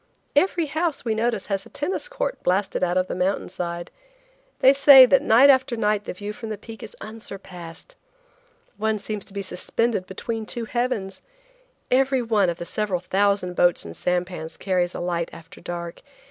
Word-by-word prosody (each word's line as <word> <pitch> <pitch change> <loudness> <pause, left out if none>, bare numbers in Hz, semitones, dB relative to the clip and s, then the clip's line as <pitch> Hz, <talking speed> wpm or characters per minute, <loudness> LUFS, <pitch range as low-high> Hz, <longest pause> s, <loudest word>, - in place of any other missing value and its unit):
Every 345 +2 +2
house 315 0 -2
we 225 - +1
notice 225 -2 0
has 195 -1 -2
a - - -15
tennis 370 - -3
court - - -3
blasted 190 +1 0
out 180 0 +1
of 185 - +2
the - - -5
mountain 185 +2 -1
side. 170 -1 -5 0.7
They 265 +1 +6
say 275 -1 +9
that 270 +2 +4
after 260 +1 +5
night 210 -2 0
the - - -4
view 205 +3 -6
from 225 +1 -8
the 215 - -4
peak 225 +2 -11
is 225 - -9
unsurpassed. 195 - -7 0.8
One 220 +1 0
seems 210 0 -5
to - - -13
be 200 0 -4
suspended 195 +2 -1
between 220 +3 -5
two 235 -1 -1
heavens. 240 -5 -2 0.7
Every 265 0 +3
one 210 -5 +2
of 170 - -3
the 170 - -6
several 200 -1 -2
thousand 195 0 0
boats 175 0 +3
and 85 0 -8
sampans 180 -2 -2
carries 180 -2 -1
a - - -4
light 175 -1 -2
after 165 -1 -13
dark. 170 -1 -6
210 Hz, 175 wpm, -23 LUFS, 180-240 Hz, 0.8 s, say